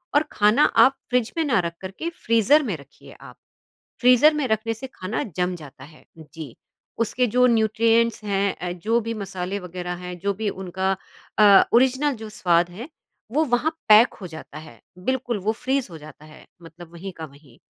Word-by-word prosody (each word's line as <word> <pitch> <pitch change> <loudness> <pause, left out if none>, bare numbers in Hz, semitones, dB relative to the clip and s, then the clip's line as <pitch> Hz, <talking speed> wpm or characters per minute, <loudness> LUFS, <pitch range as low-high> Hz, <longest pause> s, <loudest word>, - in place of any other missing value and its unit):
और 290 - +5
खाना 210 +7 +3 0.2
आप 270 - +2
फ्रिज 245 -2 0
में 325 - +2
ना 255 -10 +2
रख 170 -1 -2
कर 190 0 -6
के 335 - -2 0.2
फ्रीज़र 230 +7 +4
में 215 -9 -3
रखिए 140 -1 -17
आप। - - -13 0.7
फ्रीज़र 255 +5 +5
में 295 -3 -1
रखने 220 +1 -1
से 265 +4 -8
खाना 185 +4 -4
जम 180 0 0
जाता 145 -4 -13
है 155 +1 -17
जी, 155 -4 -11 0.4
उसके 235 +2 0
जो 250 +2 +3
न्यूट्रिएंट्स 230 0 +2
हैं 195 -3 -2
जो 225 +6 +1
भी 230 0 -4
मसाले 195 -2 -5
वगैरह 180 0 -6
हैं, 180 0 -7
जो 200 +3 -1
भी 215 +1 -3
उनका 190 0 -3 0.5
अ, 205 -2 +7
ओरिजिनल 265 +4 +3
जो 220 - -7
स्वाद 175 -4 +1
है 220 - -9 0.4
वो 310 +4 +2
वहाँ 260 +3 +1 0.2
पैक 215 +3 +7
हो 190 - -6
जाता 160 -2 -10
है 150 -8 -14 0.2
बिल्कुल 255 -3 -1
वो 215 - +2
फ्रीज़ 255 +3 -2
हो 165 - -9
जाता 150 0 -14
है। 155 0 -16 0.2
मतलब 170 +1 -13
वहीं 185 +3 -8
का 160 -2 -9
वहीं। 140 -4 -20
205 Hz, 185 wpm, -23 LUFS, 175-240 Hz, 0.7 s, अ